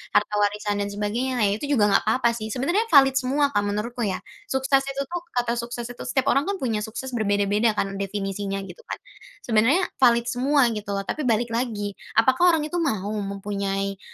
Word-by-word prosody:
harta - - +3
warisan 205 0 0
dan 200 - -1
sebagainya. 215 +6 -2
Nah, 210 - +4
itu 215 +8 -3
juga 210 -7 +3
nggak - - +4
apa-apa 235 +2 +3
sih, 220 -2 -5
sebenarnya 345 - 0
valid 270 -2 +7
semua 280 +2 +1
Kak 205 - +2
menurutku 215 +3 -2
ya. 190 - -2 0.3
Sukses 270 -3 +2
itu 275 0 -3
tuh, 350 +3 -4
kata 240 -1 +1
sukses 235 0 -5
itu 245 0 -8
setiap 260 +1 0
orang 280 +5 +2
kan 400 - 0
punya 230 -5 0
sukses 235 +4 -6
berbeda-beda 205 0 +1
kan, 195 0 -2
definisinya 195 0 -3
gitu 180 -2 -11
kan. - - -3 0.5
Sebenarnya, 240 - +3 0.2
valid 235 -3 +5
semua 255 +1 +2
gitu 210 -1 -6
loh, 195 - -2
tapi 305 - -2
balik 235 0 +1
lagi, 225 -4 -2 0.3
apakah 265 +9 +4
orang 310 - -1
itu 350 - -3
mau 215 - -1
mempunyai, 195 0 -3
230 Hz, 190 wpm, -24 LUFS, 205-265 Hz, 0.5 s, valid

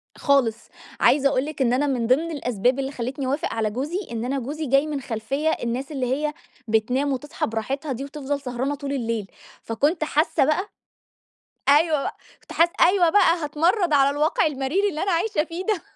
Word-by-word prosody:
خالص، 250 -6 +1 0.3
عايزة 275 -1 +4
أقول 260 0 0
لِك 300 -2 -6
إن 245 -2 +3
أنا 285 +3 +1
من 245 -4 0
ضمن 310 +7 +2
الأسباب 250 -3 0
اللي 270 0 -2
خلّيتني 265 +2 -4
أوافق 285 +7 -1
على 220 -1 0
جوزي، 280 - -3
إن 230 0 -3
أنا 270 +2 -1
جوزي 295 +5 -4
جاي 275 +2 +3
من 290 -2 -3
خلفيّة 270 +5 -2
الناس 255 0 -2
اللي 270 -4 -2
هي 300 +1 -2 0.3
بتنام 250 +6 +1
وتصحى 285 +3 -3
براحتها 265 +7 -3
دي، 260 +1 -4
وتفضل 285 0 -4
سهرانة 260 +2 -2
طول 280 0 -5
الليل، 230 -6 -3 0.3
فكنت 290 +9 0
حاسّة 305 -2 +2
بقى 355 +8 0 1.0
أيوَه 300 +1 +4
بقى، - - -4 0.2
كنت - - -16
حاسّة 340 +1 +4
أيوَه 355 -1 +5
بقى 335 -2 +4
هاتمرّد 335 +4 +1
على 275 -1 +5
الواقع 295 +4 +1
المرير 300 +8 0
اللي 310 -4 -3
أنا 390 - 0
عايشة 350 -1 +1
فيه 335 +3 -6
ده. 425 -6 0
280 Hz, 185 wpm, -23 LUFS, 255-310 Hz, 1.0 s, أيوَه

